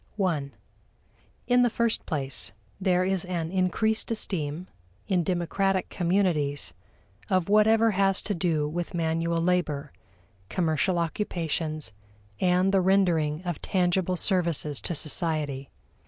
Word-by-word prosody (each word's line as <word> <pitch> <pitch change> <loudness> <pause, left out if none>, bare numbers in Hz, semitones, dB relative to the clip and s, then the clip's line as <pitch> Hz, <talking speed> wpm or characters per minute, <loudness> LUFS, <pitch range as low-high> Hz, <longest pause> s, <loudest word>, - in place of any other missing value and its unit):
(i) 150 -6 -1 1.0
In 245 0 +4
the 245 - +4
first 230 0 0
place, 135 -5 -3 0.3
there 185 -1 +2
is 190 -1 0
an 170 -3 -3
increased 195 +4 +1
esteem, 175 -7 -3 0.4
in 185 -4 +2
democratic 185 +2 0
communities, 170 -6 +1 0.6
of 185 -1 +1
whatever 220 +2 +5
has 195 -1 +2
to 210 - -1
do 165 -5 0
with 175 +3 -4
manual 165 0 0
labor, 165 -5 0 0.6
commercial 175 +1 +1
occupations, 165 - -2 0.5
and 180 +1 +3
the 195 - +4
rendering 175 -5 +2
of 175 -4 -4
tangible 185 0 +1
services 170 -7 +1
to 170 - -2
society. 150 -3 -2
175 Hz, 115 wpm, -27 LUFS, 160-190 Hz, 1.0 s, whatever